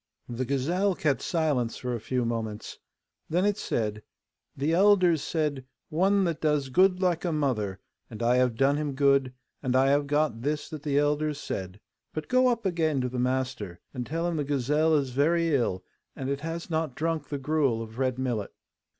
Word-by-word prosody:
The 125 +1 -3
gazelle 170 +9 +1
kept 145 -5 0
silence 145 -9 0
for 125 -1 -3
a 120 - -2
few 125 +2 -1
moments. 110 -2 -4 0.5
Then 180 +4 +2
it 205 -1 +2
said, 110 - -2 0.6
'The 145 +4 0
elders 185 -4 +5
said, 150 -5 -1 0.3
"One 195 +5 +3
that 165 -3 -1
does 150 -3 +1
good 185 +5 +3
like 175 -3 +1
a 175 - 0
mother," 115 -11 -1 0.3
and 115 -1 -6
I 120 +2 +3
have 125 -2 +2
done 135 +4 +3
him 150 -2 -2
good, 140 -1 +3 0.3
and 130 -2 0
I 135 +1 +4
have 145 0 +2
got 145 -5 +1
this 150 +3 -2
that 155 -2 -6
the 145 -1 0
elders 150 0 +1
said. 95 -6 -5 0.4
But 155 -1 -4
go 255 0 +4
up 235 -3 0
again 160 -6 +1
to 125 - -1
the 125 0 -4
master, 125 -7 -2
and 125 -3 -3
tell 165 +6 -2
him 170 -2 -1
the 150 - 0
gazelle 145 +3 +2
is 140 -3 0
very 165 +5 +2
ill, 105 -9 0 0.3
and 135 0 -3
it 140 - -2
has 165 +2 -5
not 160 -5 -1
drunk 160 -2 -2
the 145 - -2
gruel 135 -5 +1
of 110 +2 -10
red 130 -2 0
millet. 120 -6 -2
145 Hz, 195 wpm, -27 LUFS, 125-160 Hz, 0.6 s, elders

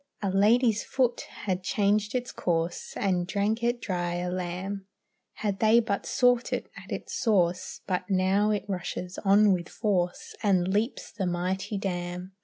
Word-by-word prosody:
A 195 - +1
lady's 220 +3 +4
foot 250 -3 0 0.2
had 185 -2 0
changed 210 +3 +1
its 250 -1 -2
course, 170 0 -2
And 180 -3 0
drank 210 +4 0
it 240 +1 +1
dry 175 -5 -2
a 180 0 -2
lamb, 185 +2 -4 0.5
Had 200 -3 -2
they 220 +2 +6
but 205 -4 -2
sought 245 -1 +3
it - - -3
at - - -11
its - - -5
source; 180 -6 +1
But 185 0 -2
now 195 +2 +3
it 210 -1 0
rushes 180 -1 -4
on 200 +1 +6
with 175 -2 -3
force 185 -5 -1
And 185 -4 +3
leaps 210 +7 -1
the 195 -4 -2
mighty 185 +4 -2
dam. 180 -1 -4
195 Hz, 160 wpm, -28 LUFS, 180-215 Hz, 0.5 s, they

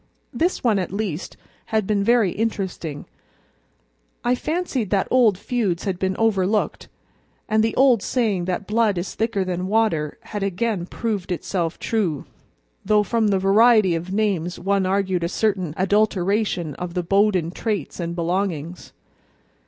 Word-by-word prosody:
This 350 +3 0
one, 220 -5 +3
at 180 - -3
least, 190 -5 -4 0.3
had 220 -2 0
been 200 0 +1
very 230 -3 +3
interesting. 190 -8 -3 1.2
I 245 - +2
fancied 280 - -2
that 195 -1 +1
old 235 -7 +4
feuds 200 -6 -1
had 190 -3 -2
been 190 -1 -1
overlooked, 210 -2 0 0.6
and 215 0 +2
the 225 - 0
old 255 -5 +5
saying 210 -9 0
that 185 +3 -2
blood 215 -1 +1
is 175 +2 -3
thicker 220 -3 0
than 180 0 -2
water 195 -8 +1
had 210 -2 -6
again 195 -1 -1
proved 205 -5 -3
itself 175 -1 -2
true, 190 -10 -1 0.6
though 210 +1 +3
from 225 0 +1
the 200 -2 +2
variety 205 0 +5
of 170 +3 -4
names 195 -4 0
one 195 +1 0
argued 190 -2 0
a 170 - 0
certain 190 -5 0
adulteration 195 -3 +1
of 180 0 -5
the 180 - 0
Bowden 195 -2 +2
traits 205 -5 -3
and 170 0 -3
belongings. 175 -1 -3
195 Hz, 145 wpm, -22 LUFS, 180-220 Hz, 1.2 s, old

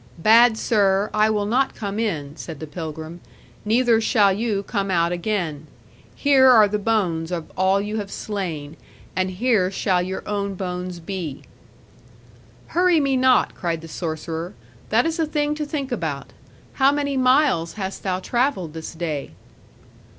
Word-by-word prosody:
'Bad 220 +5 +5
sir, 200 -3 +2
I 215 0 +3
will 210 -1 0
not 255 +6 +1
come 205 0 -4
in,' 155 -10 -2
said 160 -3 -8
the 155 - -5
pilgrim; 160 +1 -7 0.4
'neither 230 +1 +3
shall 205 -3 +3
you 205 -1 -1
come 200 -2 -2
out 170 -2 +2
again. 175 -5 -2 0.5
Here 270 -2 +5
are 220 -4 +7
the 210 +1 -2
bones 180 -7 0
of 170 -3 -4
all 190 +1 +2
you 210 +2 -3
have 205 -2 -4
slain; 165 -8 -5 0.4
and 185 0 0
here 190 -1 +1
shall 190 -1 0
your 185 +1 -5
own 200 -1 -2
bones 180 -1 -5
be.' 170 -4 -6 1.3
'Hurry 355 -1 +3
me 275 -2 +1
not,' 255 0 +3
cried 165 -2 -3
the 165 - -10
sorcerer; 165 +2 -5 0.3
'that - - +3
is 330 0 -1
a 320 - +1
thing 295 -1 0
to 300 0 -3
think 285 -3 -4
about. 160 - -4 0.4
How 270 +1 +4
many 285 -1 -1
miles 255 - +3
hast 195 -2 -5
thou 185 -2 -1
travelled 235 - -1
this 160 +1 -7
day?' 160 -4 -4
200 Hz, 160 wpm, -22 LUFS, 170-240 Hz, 1.3 s, are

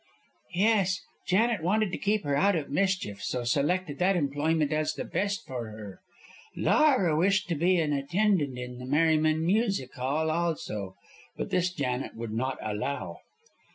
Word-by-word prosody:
"Yes. 195 -2 +3 0.3
Janet 220 +2 +2
wanted 205 +4 +1
to - - -3
keep 210 +1 +1
her 145 -1 0
out 195 +6 +3
of 150 -4 -3
mischief, 185 - 0
so 125 +3 -2
selected 145 +5 0
that 190 +2 +3
employment 150 0 0
as 155 0 0
the - - -4
best 200 0 -2
for 120 -4 -5
her. 105 -3 -10 0.5
Laura 260 - +3
wished 195 +5 +2
to 170 - 0
be 180 +4 +3
an 155 -3 +1
attendant 145 -1 +1
in 125 0 -7
the 125 - -7
Merryman 155 +2 +2
Music 195 - +1
Hall, 145 +5 -1
also, 150 - -2 0.4
but - - -4
this 180 0 +1
Janet 135 -6 -3
would 115 -1 -5
not 130 +3 -1
allow." 110 +7 -3
155 Hz, 155 wpm, -28 LUFS, 135-185 Hz, 0.5 s, Yes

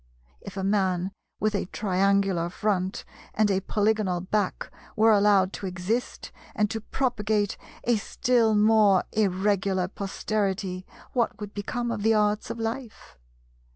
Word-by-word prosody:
If - - -9
a 190 - -2
man 190 -2 +1 0.3
with 215 0 +1
a 200 -3 -1
triangular 195 -3 +1
front 190 -1 -1 0.3
and 210 -1 +3
a 190 - +2
polygonal 205 -2 0
back 200 +1 -2 0.2
were 220 +1 +5
allowed 200 -2 +4
to 195 - -5
exist 185 +7 -3 0.2
and 210 -1 +1
to 225 - -3
propagate 215 -5 -1 0.3
a 240 -1 +2
still 225 +1 +1
more 210 -2 +5
Irregular 195 -2 +1
posterity, 195 -1 -3 0.3
what 240 -3 0
would 210 -1 -7
become 240 +4 -3
of 205 - -3
the 220 +1 +3
arts 210 0 +1
of - - -4
life? 225 - -6
205 Hz, 135 wpm, -26 LUFS, 190-220 Hz, 0.3 s, were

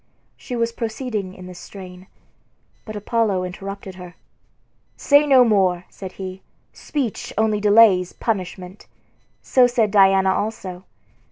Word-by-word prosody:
She 250 - -7
was 230 0 0
proceeding 220 -4 -4
in 185 - -11
this 180 -1 -10
strain, 185 -1 -11 0.8
but 215 - -8
Apollo 210 -3 0
interrupted 195 +1 -7
her. 180 -2 -11 0.8
"Say 290 +1 +4
no 265 -3 +7
more," 185 -5 +2
said 190 -2 -9
he; 190 0 -7 0.3
"speech 270 -8 -4
only 215 -1 +1
delays 205 -3 +5
punishment." 185 -3 -5 0.6
So 255 -2 +4
said 235 -4 +1
Diana 195 -1 +4
also. 190 -4 -4
200 Hz, 120 wpm, -21 LUFS, 185-225 Hz, 0.8 s, no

